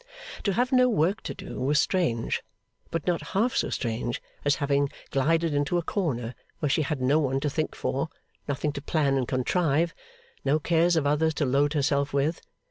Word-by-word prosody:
To 200 Hz, -, +2 dB
have 245 Hz, +6 st, +1 dB
no 255 Hz, -1 st, +5 dB
work 200 Hz, +1 st, +1 dB
to -, -, -5 dB
do -, -, -7 dB
was 145 Hz, +4 st, +2 dB
strange, 155 Hz, -13 st, +1 dB, 0.5 s
but 165 Hz, -2 st, -3 dB
not 175 Hz, -2 st, +1 dB, 0.2 s
half 235 Hz, +4 st, +2 dB
so -, -, +1 dB
strange 120 Hz, -1 st, -2 dB, 0.2 s
as 145 Hz, -1 st, +3 dB
having 140 Hz, -1 st, +1 dB, 0.2 s
glided 160 Hz, +4 st, +2 dB
into 145 Hz, +4 st, +1 dB
a 170 Hz, -, 0 dB
corner 125 Hz, -, -2 dB, 0.2 s
where 150 Hz, -3 st, 0 dB
she 155 Hz, -, +2 dB
had 140 Hz, -3 st, -2 dB
no 140 Hz, +4 st, +4 dB
one 135 Hz, -3 st, +1 dB
to 150 Hz, -, 0 dB
think 155 Hz, +2 st, -2 dB
for, 140 Hz, +4 st, -2 dB, 0.4 s
nothing 145 Hz, +1 st, -1 dB
to 140 Hz, -, -6 dB
plan 145 Hz, -2 st, +1 dB
and 130 Hz, -3 st, 0 dB
contrive, 160 Hz, +5 st, +1 dB, 0.5 s
no 140 Hz, +3 st, +3 dB
cares 170 Hz, +2 st, +2 dB
of 160 Hz, -3 st, +1 dB
others 150 Hz, +2 st, +2 dB
to 150 Hz, -, +1 dB
load 140 Hz, +3 st, +2 dB
herself 140 Hz, -1 st, +1 dB
with. 140 Hz, +4 st, 0 dB
150 Hz, 190 wpm, -27 LUFS, 140-165 Hz, 0.5 s, no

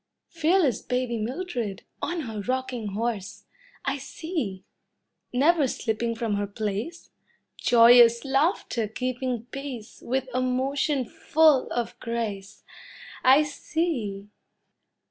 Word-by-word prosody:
Fearless 330 Hz, -, +2 dB
baby 250 Hz, -2 st, -1 dB
Mildred, 240 Hz, -, -3 dB, 0.2 s
on 345 Hz, -1 st, -2 dB
her 220 Hz, -6 st, -5 dB
rocking 250 Hz, -3 st, -3 dB
horse 220 Hz, -2 st, -3 dB, 0.4 s
I 275 Hz, 0 st, -1 dB
see! 270 Hz, -, -4 dB, 0.7 s
Never 290 Hz, +3 st, +3 dB
slipping 230 Hz, -1 st, -2 dB
from 225 Hz, -3 st, -1 dB
her 205 Hz, 0 st, -1 dB
place, 215 Hz, -, -4 dB, 0.4 s
Joyous 235 Hz, +1 st, +6 dB
laughter 270 Hz, -, +1 dB
keeping 250 Hz, +1 st, -3 dB
pace 260 Hz, -5 st, -7 dB
With 260 Hz, +2 st, -1 dB
a 255 Hz, -, +1 dB
motion 265 Hz, +2 st, 0 dB
full 305 Hz, +1 st, +3 dB
of 240 Hz, -1 st, -3 dB
grace 220 Hz, -5 st, -4 dB, 0.6 s
I 270 Hz, +4 st, +7 dB
see! 280 Hz, -, -3 dB
250 Hz, 105 wpm, -26 LUFS, 225-280 Hz, 0.7 s, I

